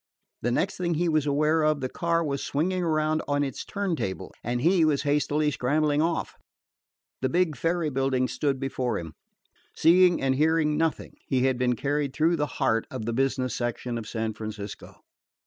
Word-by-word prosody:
The 120 - 0
next 190 +10 0
thing 175 -2 -1
he 175 +3 +1
was 155 -2 +1
aware 150 +3 +2
of, 155 -1 +2
the 130 - -2
car 170 +5 0
was 140 -3 -2
swinging 180 +6 -1
around 155 -2 +1
on 145 0 +1
its 135 -3 -4
turn 200 -4 -2
table 95 -10 -4
and 120 +1 -1
he 170 +5 +3
was 145 -3 +2
hastily 150 +1 +1
scrambling 150 +3 +1
off. 165 +1 -1 0.9
The 130 - +1
big 175 -3 +1
ferry 165 +2 0
building 130 -1 +1
stood 140 -1 -1
before 130 -2 -2
him. 80 -2 -7 0.6
Seeing 175 +1 +5
and 135 -1 +1
hearing 155 +1 +2
nothing, 160 0 -2
he 130 -2 +1
had 130 -2 +1
been 125 -1 +2
carried 140 +2 -1
through 165 +2 +2
the 150 -1 0
heart 115 -5 +1
of 125 -4 -5
the 115 - -2
business 130 -1 0
section 120 0 -3
of 110 - -8
San 110 -1 -2
Francisco. 105 -1 -8
145 Hz, 180 wpm, -26 LUFS, 130-160 Hz, 0.9 s, Seeing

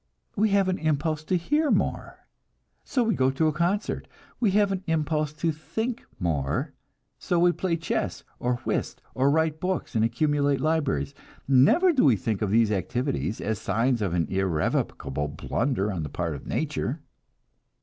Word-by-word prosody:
We 215 +1 +3
have 200 -1 +3
an 185 0 0
impulse 155 0 0
to 185 - +1
hear 295 - +1
more, - - -1 0.6
so 250 - 0
we 225 -1 +1
go 130 -5 +2
to 135 +4 0
a 155 - +1
concert. 175 +7 -1 0.3
We 225 - +3
have 205 -1 +3
an 190 -1 -2
impulse 155 -1 0
to 160 +2 0
think 220 +10 -4
more, 75 -7 -1 0.5
so 175 - 0
we 175 +1 +5
play 175 -1 -1
chess, 165 - -2 0.2
or 125 0 0
whist, - - -2
or 135 +2 +2
write 155 +1 +1
books 185 -2 -2
and 110 -2 +2
accumulate 140 +4 +1
libraries. 145 - 0 0.3
Never 150 - +5
do 270 - +3
we 130 -6 +6
think 105 +1 -2
of 105 - 0
these 110 +1 +3
activities 120 - -1
as 110 0 -2
signs 115 +4 +1
of 95 -4 0
an 85 -2 +1
irrevocable 75 -6 -1
blunder 105 - -1
on 85 - -3
the 75 - -4
part 85 +2 -2
of 70 - -9
nature. - - -2
145 Hz, 170 wpm, -26 LUFS, 105-170 Hz, 0.6 s, we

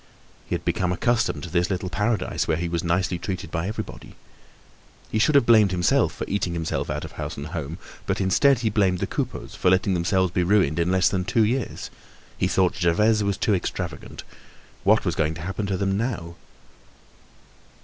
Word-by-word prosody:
He - - -1
had - - -6
become 90 -1 0
accustomed 115 +6 0
to 90 - -6
this 85 +1 +1
little 95 -1 -2
paradise 105 +1 -1
where 80 - +1
he 85 +1 -2
was 85 0 -2
nicely 90 +1 0
treated 95 +1 -5
by 80 +2 -2
everybody. 110 +1 -7 1.0
He 110 - 0
should 145 +7 +3
have 140 - +6
blamed 110 -4 +6
himself 90 -1 +2
for - - -5
eating 95 -3 -1
himself 80 -1 -2
out - - -3
of - - -9
house - - -6
and 70 - -5
home, 80 -1 -5 0.3
but - - 0
instead 125 +7 +3
he 110 - +2
blamed 95 -3 +2
the - - -1
Coupeaus - - -4
for 90 - +1
letting 95 +1 +2
themselves 90 +1 +1
be 90 - 0
ruined 90 -4 +2
in 85 +1 +1
less 95 -1 +3
than 90 +1 0
two 110 +5 +2
years. 120 +2 -2 0.4
He 90 - 0
thought 95 -1 +2
Gervaise 105 +5 +2
was 100 -1 0
too 105 - +1
extravagant. 90 - -4 0.6
What 105 +3 +4
was 85 - +1
going 80 -1 0
to 80 - -8
happen 95 +4 -3
to 95 -1 -1
them 95 +1 0
now? 105 -8 -3
95 Hz, 195 wpm, -24 LUFS, 85-105 Hz, 1.0 s, have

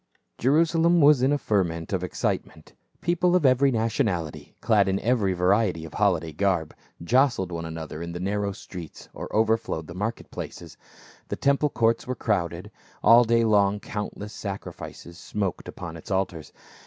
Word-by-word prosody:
JERUSALEM 165 +5 +3
was 145 -3 +6
in 130 +2 +3
a 145 - +3
ferment 90 - -1
of 90 -1 -1
excitement; 90 - -3 0.3
people 175 +1 +2
of 175 -5 +2
ever),' 130 +1 +5
nationality, 110 - -1
clad 105 -4 +3
in 95 0 +1
every 110 -5 +1
variety 90 -2 +1
of 80 - -11
holiday 85 -6 +1
garb, 90 -2 0 0.3
jostled 120 -4 +2
one 85 -1 -4
another 80 -1 -6
in 85 0 -5
the 85 - -5
narrow 100 +2 -1
streets, 90 -4 -10
or - - -7
overflowed 110 -7 +1
the 85 - -9
market 105 +5 -4
places. 85 -3 -8 0.5
The - - -3
temple 140 +2 +2
courts 115 -3 +1
were 130 - -2
crowded; 90 -2 -2 0.3
all 120 +1 +8
day 115 0 +3
long 105 -2 +3
countless 105 0 -6
sacrifices 95 -3 -7
smoked 100 -2 -3
upon 85 -2 -7
its 80 - -11
altars. 95 -5 -2
100 Hz, 155 wpm, -25 LUFS, 85-120 Hz, 0.5 s, all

